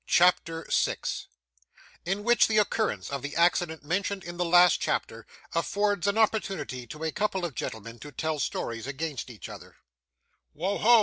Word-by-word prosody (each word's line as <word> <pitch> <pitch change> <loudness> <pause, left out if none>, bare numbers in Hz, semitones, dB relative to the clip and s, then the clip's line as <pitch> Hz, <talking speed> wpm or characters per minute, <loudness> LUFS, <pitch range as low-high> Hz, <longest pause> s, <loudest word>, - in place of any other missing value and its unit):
CHAPTER 165 -2 +3
6 - - 0 0.8
In 195 +3 -1
which 240 +2 +5
the 215 - +1
Occurrence 215 -3 +1
of 140 -1 -3
the 145 +2 -5
Accident 170 -2 +2
mentioned 195 +3 -1
in 175 0 -7
the 180 - +1
last 175 +1 +6
Chapter, 115 -1 -2 0.3
affords 200 +2 +1
an 200 +2 +1
Opportunity 195 - 0
to 150 +7 -8
a 160 - 0
couple 195 -2 -1
of 165 - -4
Gentlemen 115 0 -6
to 145 - -9
tell 155 +2 -2
Stories 115 -3 -3
against 140 -2 -4
each 115 -4 -9
other - - -11 0.8
'Wo 185 +6 -1
ho! 235 +1 +7
175 Hz, 165 wpm, -28 LUFS, 145-200 Hz, 0.8 s, ho